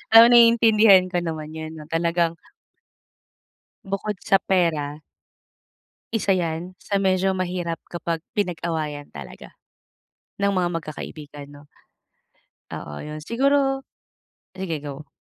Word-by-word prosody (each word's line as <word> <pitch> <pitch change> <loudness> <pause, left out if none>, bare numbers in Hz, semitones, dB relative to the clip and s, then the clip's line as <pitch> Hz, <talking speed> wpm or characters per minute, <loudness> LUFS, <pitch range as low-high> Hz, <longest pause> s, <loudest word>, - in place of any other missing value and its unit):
Oo 225 +1 +12
naiintindihan 225 -5 +6
ko 180 - 0
naman 160 -3 -5
yun 160 0 -6
'no 155 - -9
talagang 170 0 +1 1.5
Bukod 195 +2 -3
sa 195 - +4
pera. 165 -7 0 1.2
Isa 215 -2 0
yan 175 0 -1
sa 200 -1 -1
medyo 190 0 +2
mahirap 180 -2 -3
kapag 170 -2 -3
pinag-awayan 160 -6 -3
talaga 70 -3 -10 0.9
ng 200 0 +2
mga 180 -1 +1
magkakaibigan, 150 -2 -9
'no. 145 0 -14 1.1
Oo 75 - -7
yun, 150 0 -7
siguro 270 - +1 0.7
sige, 175 -6 -5
go. 145 +1 -7
175 Hz, 105 wpm, -23 LUFS, 155-195 Hz, 1.5 s, Oo